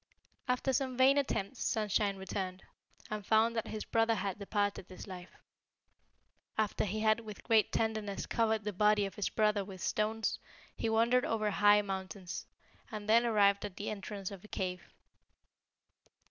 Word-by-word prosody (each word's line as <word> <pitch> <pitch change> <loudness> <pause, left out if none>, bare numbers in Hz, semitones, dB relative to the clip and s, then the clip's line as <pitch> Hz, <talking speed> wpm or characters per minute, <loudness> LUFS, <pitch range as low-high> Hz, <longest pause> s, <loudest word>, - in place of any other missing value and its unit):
"After 250 +1 +1
some 260 -1 -1
vain 270 +2 +6
attempts 260 -3 -2
Sunshine 210 -2 +1
returned, 190 -1 -4 0.5
and 210 -1 -3
found 220 +3 +3
that 225 - -2
his 215 - -5
brother 225 0 +2
had 195 -1 -3
departed 205 -2 -1
this 185 - -10
life. 185 -2 -9 1.3
After 215 -1 +1
he 215 +2 -2
had 215 +1 +3
with 215 -3 -9
great 225 -2 +3
tenderness 215 -3 -1
covered 220 -2 +1
the 210 0 -3
body 210 +1 +3
of 195 - -5
his 205 - -2
brother 210 -2 +2
with 190 -1 -10
stones, 215 +4 -1 0.4
he 225 - -1
wandered 235 +3 +3
over 215 -2 0
high 205 +1 +5
mountains, 190 -1 -5 0.4
and 210 -1 -6
then 230 +2 +5
arrived 200 -3 +4
at 205 -3 -5
the 205 - -3
entrance 200 -1 -5
of 195 -2 -9
a - - -12
cave. 185 -3 -4
210 Hz, 160 wpm, -33 LUFS, 195-225 Hz, 1.3 s, vain